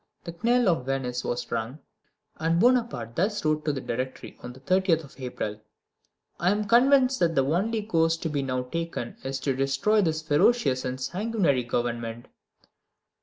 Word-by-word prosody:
The 170 - -7
knell 240 0 +3
of 160 -8 +1
Venice 125 -2 -2
was 120 0 -3
rung; 115 +5 -3 0.6
and 165 +2 +1
Bonaparte 230 - +1
thus 205 +1 0
wrote 155 0 +1
to 150 - +2
the 140 - -3
Directory 130 +2 -5
on 125 - -7
the 125 - -14
30th 180 +2 +2
of 135 -2 -15
April: 110 -4 -4 0.8
"I 175 - +2
am 205 +2 +1
convinced 255 +4 +4
that 165 -2 +2
the 135 - +3
only 205 +9 0
course 165 -5 +2
to 165 - -3
be 145 -2 -1
now 130 -1 -2
taken 165 -3 -5
is 135 0 -3
to 135 -1 0
destroy 135 +11 +2
this 160 -3 -1
ferocious 145 - +2
and 130 0 -3
sanguinary 185 - 0
Government." 120 -1 -3
155 Hz, 170 wpm, -26 LUFS, 130-190 Hz, 0.8 s, convinced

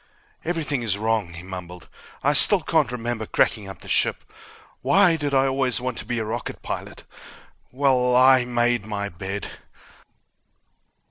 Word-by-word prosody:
"Everything 155 -6 -2
is 105 -4 0
wrong," 110 -5 -1
he 85 - -9
mumbled. 90 -2 -9 0.4
"I 145 - +3
still 185 +6 +7
can't 155 -6 0
remember 120 -2 -4
cracking 105 -3 0
up 95 - -11
the - - -12
ship. - - 0 0.6
Why 195 -4 +4
did 145 -3 -3
I 135 0 +3
always 135 -1 0
want 125 -1 -4
to - - -8
be 120 - -3
a 110 - -2
rocket 115 +2 -6
pilot? - - -6 0.7
Well... 125 -2 +1
I 130 0 +6
made 120 -2 0
my 100 -1 -4
bed!" 95 +3 -6
120 Hz, 150 wpm, -23 LUFS, 105-135 Hz, 0.7 s, still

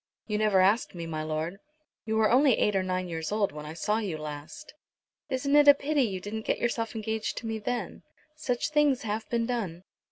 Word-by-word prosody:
"You 210 -1 -1
never 210 -3 +4
asked 200 +2 +2
me, 170 -1 -5
my 155 -1 -3
lord." 155 +4 -3 0.5
"You 220 0 -1
were 220 -1 +3
only 260 0 +5
eight 210 - +2
or 190 - +3
nine 185 0 -2
years 160 0 -4
old 210 -1 +1
when 150 0 -8
I 155 - -7
saw 210 +6 0
you 195 -8 -3
last." 150 - -8 0.6
"Isn't 275 +2 +1
it 295 0 +6
a 285 - +10
pity 290 +1 0
you 200 -7 0
didn't 210 +3 -5
get - - -1
yourself 235 -1 -2
engaged 220 0 -3
to - - -5
me 225 -1 -2
then? 240 +3 -3 0.3
Such 255 -3 -2
things 295 -4 +3
have 220 0 -3
been 235 -1 +1
done." 200 -8 -3
215 Hz, 215 wpm, -28 LUFS, 185-240 Hz, 0.6 s, a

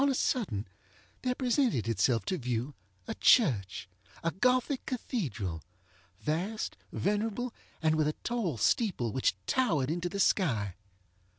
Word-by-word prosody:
On 280 - +4
a 270 - +1
sudden, 150 - 0 0.5
there 250 -1 0
presented 245 - +1
itself 115 0 +2
to 185 - -1
view 125 +2 -2 0.3
a - - -2
churchŌĆöa 100 - +1
Gothic 250 +2 +2
cathedralŌĆövast, 100 - -4 0.2
venerable, 220 +4 -1 0.3
and 155 0 +4
with 155 -1 +2
a 150 - -1
tall 220 - -1
steeple, 130 - +1
which 130 -6 +1
towered 155 - +2
into 175 +1 -1
the 200 - -4
sky. 115 - +2
155 Hz, 120 wpm, -31 LUFS, -, 0.5 s, On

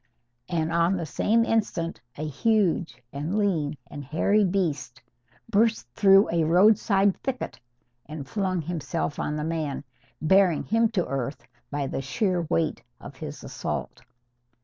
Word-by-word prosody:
And 165 -2 0
on 170 +3 +2
the 170 - -3
same 225 +9 +2
instant 185 -7 -1 0.2
a 155 - -3
huge 175 - +1
and 155 +8 -2
lean 165 -8 0
and 145 - -8
hairy 165 +9 +2
beast 170 -10 -1 0.5
burst 225 - +2
through 195 - +6
a 165 -1 +2
roadside 195 +3 +4
thicket 265 -2 -4 0.5
and 150 -2 -7
flung 185 -1 -1
himself 165 -2 -3
on 150 - -1
the 150 - -2
man, 155 -3 -2 0.4
bearing 185 0 +4
him 225 +1 +2
to 180 -5 +1
earth 135 +1 -3 0.3
by 145 -1 -2
the 135 - -3
sheer 180 - 0
weight 165 -2 0 0.2
of - - -11
his - - -7
assault. - - -5
170 Hz, 140 wpm, -26 LUFS, 150-200 Hz, 0.5 s, through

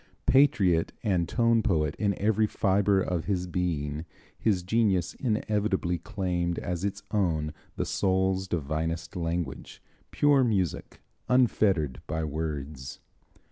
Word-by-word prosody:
Patriot 100 - +3
and 90 -7 +1
tone 115 +1 +3
poet 75 -7 +1
in 100 -3 +1
every 110 +1 +2
fibre 100 -1 +2
of 90 -3 -1
his 90 -3 -1
being, 80 -4 -2 0.3
his 100 -5 0
genius 95 -3 +1
inevitably 105 -6 -1
claimed 90 -2 -2
as 90 0 -3
its 100 0 -3
own 80 -7 0 0.2
the - - -2
soul's 95 0 +1
divinest 80 +2 -3
language, 85 -5 -3 0.3
pure 145 -2 +4
music, 100 -8 -1 0.3
unfettered 95 - +2
by 80 +1 -2
words. 75 -3 -4
90 Hz, 115 wpm, -28 LUFS, 80-105 Hz, 0.3 s, pure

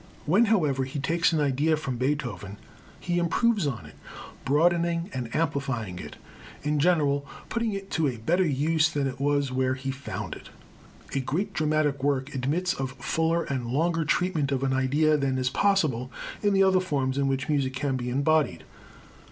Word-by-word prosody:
When, 195 +10 +4
however, 155 - +2
he 135 +3 -6
takes 165 +5 +2
an 160 - +1
idea 145 +2 +2
from 135 -5 -4
Beethoven, 125 -7 -2 0.4
he 175 0 -1
improves 195 +2 +2
on 125 -5 -4
it, - - -13 0.5
broadening 170 +4 +2
and 125 -3 -4
amplifying 135 - -1
it, - - -8 0.5
in 150 0 0
general 145 -4 +2 0.3
putting 230 -2 -1
it 195 0 -6
to 160 -3 +1
a 125 -3 -2
better 170 +12 +1
use 155 +3 +2
than 145 -3 -1
it 135 0 -4
was 140 -1 +1
where 130 0 +1
he 135 +1 -4
found 135 +1 -6
it. - - -11 0.6
A 135 - +1
great 180 +10 -2
dramatic 150 -3 +1
work 140 0 0
admits 155 +8 0
of 135 -5 -4
fuller 160 +6 0
and 130 -5 -3
longer 165 +6 +1
treatment 155 -3 0
of 135 -1 0
an 135 -1 +1
idea 145 +4 +3
than 135 -2 0
is 130 0 0
possible 150 -12 +1 0.3
in 205 -1 +2
the 195 - +5
other 190 -1 +4
forms 140 -7 -1
in 140 - +2
which 135 -1 -1
music 140 -4 0
can 135 0 -1
be 125 -1 -3
embodied. 140 - +1
145 Hz, 175 wpm, -27 LUFS, 130-165 Hz, 0.6 s, the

